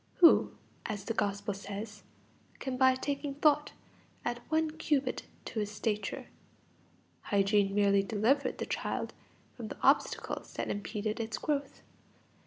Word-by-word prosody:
Who, 340 -3 +6 0.3
as 210 -4 -3
the 225 - -1
Gospel 200 -1 -1
says, 205 +1 -6 0.6
can 265 -1 -3
by 260 0 +5
taking 280 +1 -3
thought 295 0 +3 0.5
add 240 0 -2
one 315 0 +2
cubit 295 -4 0 0.2
to 225 - -3
his 210 -1 -1
stature? 210 -1 -2 1.0
Hygiene 200 0 +3
merely 200 -1 +5
delivered 220 +8 +1
the - - -2
child - - -2 0.4
from - - -6
the - - -7
obstacles - - +2
that - - -2
impeded 210 +2 -3
its 225 -1 -2
growth. 285 -2 -2
225 Hz, 130 wpm, -32 LUFS, 205-280 Hz, 1.0 s, Who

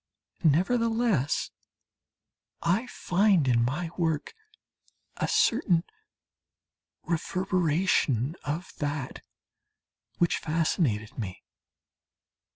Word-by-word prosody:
Nevertheless 210 - +2 1.1
I 190 +9 +1
find 190 - +2
in 120 -2 +3
my 155 +7 -2
work 160 -3 -1 0.8
a - - 0
certain 195 - +3 1.2
reverberation 170 - +1
of 155 +6 -4
that 145 -3 -3 1.0
which 170 - +2
fascinated 155 - 0
me. 95 -5 -6
165 Hz, 65 wpm, -28 LUFS, 145-185 Hz, 1.2 s, in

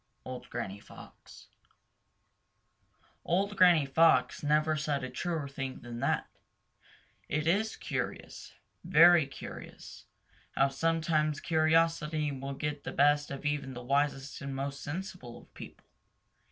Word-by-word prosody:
—Old 125 -1 -8
Granny 100 +1 -5
Fox. - - -15 1.7
Old 200 +4 0
Granny 175 -6 +6
Fox 160 +4 +3
never 155 +1 +2
said 150 -3 -2
a 130 - -5
truer 165 -5 -3
thing 135 -1 -6
than 120 -1 -7
that. - - 0 1.0
It 150 +1 -1
is 210 +7 +1
curious, - - -5 0.3
very 170 -3 +6
curious, 135 - -10 0.5
how 135 +1 +3
sometimes 155 0 0
curiosity 160 -1 +1
will 135 0 -5
get 145 +1 -4
the - - -5
best 145 +1 +3
of 140 +1 -7
even 145 -3 -2
the 125 - -7
wisest 140 +1 -1
and 140 -1 -5
most 140 +1 -4
sensible 175 -6 -6
of - - -18
people. - - -12
150 Hz, 125 wpm, -30 LUFS, 135-165 Hz, 1.7 s, Granny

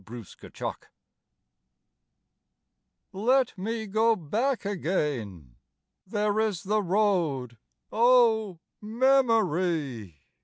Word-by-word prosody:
ATTAINMENT 115 0 -8 2.3
Let 245 +6 +1
me 220 +3 -4
go 220 +3 +2
back 225 - -2
again. 135 - -3 0.5
There 210 +1 0
is 210 -6 -1
the 210 +2 0
road, 170 - 0 0.3
O 225 -5 +3 0.2
memory! 185 - +1
205 Hz, 70 wpm, -27 LUFS, 150-225 Hz, 2.3 s, O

